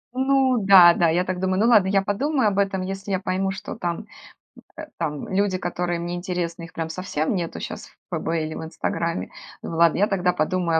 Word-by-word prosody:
Ну 265 Hz, -2 st, +2 dB
да-да, 175 Hz, -3 st, +7 dB
я 175 Hz, +3 st, +2 dB
так 185 Hz, -1 st, -3 dB
думаю: 190 Hz, 0 st, 0 dB
"Ну, 220 Hz, -, +3 dB
ладно, 210 Hz, -6 st, +5 dB
я 195 Hz, 0 st, +2 dB
подумаю 255 Hz, +3 st, +1 dB
об 200 Hz, 0 st, -1 dB
этом, 195 Hz, -2 st, 0 dB
если 195 Hz, +1 st, -6 dB
я 190 Hz, -, +1 dB
пойму, 190 Hz, +1 st, -1 dB
что 195 Hz, +2 st, -6 dB
там, 175 Hz, -6 st, -3 dB
м, -, -, -9 dB, 0.7 s
э, -, -, -6 dB
там 150 Hz, -3 st, -3 dB
люди, 195 Hz, -1 st, 0 dB
которые 175 Hz, -1 st, -2 dB
мне 175 Hz, +1 st, -4 dB
интересны, 175 Hz, -2 st, -4 dB
их 170 Hz, -, -11 dB
прям 165 Hz, -1 st, -4 dB
совсем 165 Hz, -2 st, -2 dB
нету 170 Hz, -2 st, -4 dB
щас -, -, -7 dB
в -, -, -22 dB, 0.2 s
'ФБ' -, -, -4 dB
или 155 Hz, 0 st, -5 dB
в -, -, -6 dB
'Инстаграме'". 165 Hz, -, -3 dB, 0.3 s
Думаю: 165 Hz, -, -5 dB
"Ладно, 170 Hz, -1 st, +4 dB
я 205 Hz, -, +4 dB
тогда 180 Hz, -2 st, +1 dB
подумаю 165 Hz, 0 st, 0 dB
185 Hz, 210 wpm, -23 LUFS, 170-195 Hz, 0.7 s, да-да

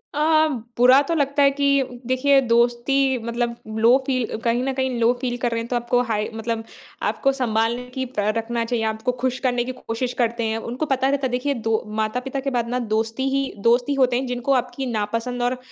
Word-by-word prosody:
अ -, -, -1 dB
अ, 315 Hz, 0 st, +4 dB, 0.3 s
बुरा 255 Hz, +3 st, +7 dB
तो 290 Hz, +4 st, -2 dB
लगता 285 Hz, -1 st, +2 dB
है 275 Hz, -, +5 dB
कि 275 Hz, -3 st, 0 dB
देखिए 270 Hz, +2 st, +4 dB
दोस्ती 240 Hz, +3 st, +2 dB, 0.3 s
मतलब 235 Hz, 0 st, -2 dB, 0.3 s
लो 240 Hz, +3 st, +7 dB
फ़ील 255 Hz, -4 st, -1 dB
कहीं 235 Hz, +1 st, +1 dB
न 270 Hz, 0 st, -1 dB
कहीं 260 Hz, 0 st, 0 dB
लो 230 Hz, +1 st, +4 dB
फ़ील 245 Hz, -1 st, -2 dB
कर 240 Hz, -, 0 dB
रहे 230 Hz, -, -1 dB
हैं 230 Hz, -, -6 dB
तो 245 Hz, -, -2 dB
आपको 240 Hz, +1 st, +1 dB
हाई 210 Hz, -1 st, 0 dB
मतलब 225 Hz, 0 st, -3 dB, 0.5 s
आपको 275 Hz, -, +1 dB
सँभालने 235 Hz, -2 st, 0 dB
की 260 Hz, 0 st, -2 dB
प 250 Hz, -3 st, -6 dB, 0.2 s
रखना 230 Hz, +1 st, -1 dB
चाहिए, 230 Hz, -1 st, -1 dB
आपको 220 Hz, +2 st, -1 dB
खुश 250 Hz, +1 st, -2 dB
करने 245 Hz, -1 st, +1 dB
की 255 Hz, -, -3 dB
कोशिश 250 Hz, 0 st, -4 dB
करते 235 Hz, 0 st, 0 dB
हैं। 220 Hz, 0 st, -1 dB
उनको 245 Hz, +6 st, -3 dB
पता 270 Hz, -2 st, +1 dB
रहता 280 Hz, -1 st, 0 dB
है -, -, -7 dB
देखिए 255 Hz, +3 st, 0 dB
दो 225 Hz, -3 st, -1 dB, 0.2 s
माता-पिता 250 Hz, +5 st, -2 dB
के 275 Hz, +1 st, -2 dB
बाद 240 Hz, -3 st, -1 dB
ना 250 Hz, +1 st, -1 dB
दोस्ती 225 Hz, +4 st, -1 dB
ही 275 Hz, 0 st, -1 dB, 0.2 s
दोस्त 245 Hz, +1 st, +3 dB
ही -, -, +2 dB
होते 255 Hz, -2 st, +3 dB
हैं 260 Hz, -, -2 dB
जिनको 250 Hz, +2 st, 0 dB
आपकी 250 Hz, +1 st, -1 dB
नापसंद 230 Hz, +3 st, -2 dB
और 245 Hz, +1 st, 0 dB
245 Hz, 220 wpm, -22 LUFS, 235-265 Hz, 0.5 s, बुरा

